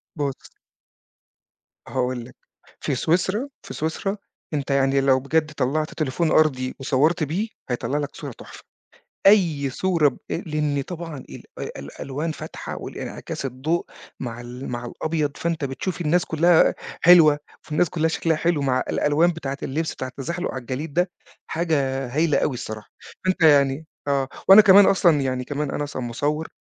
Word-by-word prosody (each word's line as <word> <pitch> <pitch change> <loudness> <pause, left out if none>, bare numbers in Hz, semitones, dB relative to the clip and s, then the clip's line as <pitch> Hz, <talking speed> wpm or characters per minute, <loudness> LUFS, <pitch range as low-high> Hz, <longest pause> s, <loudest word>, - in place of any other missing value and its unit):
بُص 140 -4 -4 1.4
هاقول 125 -2 -2
لك. 125 - -15 0.4
في - - -1
سويسرا 190 - 0
في - - -8
سويسرا، 165 +6 -2 0.4
أنت 140 -1 -2
يعني 135 0 +3
لو 135 -1 +4
بجد 155 +3 0
طلَّعت 145 +3 -1
تليفون 155 +2 0
أرضي 130 -5 +2
وصوّرت 155 +5 +2
بيه 175 +9 -1 0.2
هيطلّع 125 +3 -1
لك 145 -1 -4
صورة 145 - -6
تحفة. - - -13 0.6
أي 165 -9 +4
صورة 170 +2 +2
ب 130 - -13
لإن 150 -4 -1
طبعًا 165 0 -6
ال - - -10 0.3
الألوان 135 - -5
فاتحة 155 - -7
والإنعكاس - - -6
الضوء 135 +7 -1 0.3
مع 120 -2 -5
ال 125 +2 -8
مع 120 0 -4
الأبيض، 155 +4 -2
فأنت 165 -3 -1
بتشوف 140 +8 -4
الناس 175 +3 +2
كلّها 165 +1 +4 0.3
حلوة، 165 -4 +7 0.2
فالناس 155 +3 0
كلّها 160 -2 +1
شكلها 165 0 0
حلو 165 -2 +1
مع 130 -2 +1
الألوان 150 +4 +3
بتاعة 140 -5 -4
اللبس 160 +4 -2
بتاعة 130 - -5
التزحلق 170 +8 -4
على 130 - -4
الجليد 135 +5 -5
ده، 180 +3 +1 0.4
حاجة 140 -5 0
هايلة 155 -1 +3
أوي 145 - +1
الصراحة. 110 -3 -7 0.4
فأنت 185 -1 0
يعني 140 -1 +4 0.2
آه، 140 -2 +1 0.2
وأنا 195 +2 +11
كمان 200 -1 +8
أصلًا 170 -7 +4
يعني 130 -1 -1
كمان 145 +2 -3
أنا 145 - -2
أصلًا 145 -3 -5
مصوّر، 145 +6 -2
150 Hz, 150 wpm, -23 LUFS, 135-165 Hz, 1.4 s, وأنا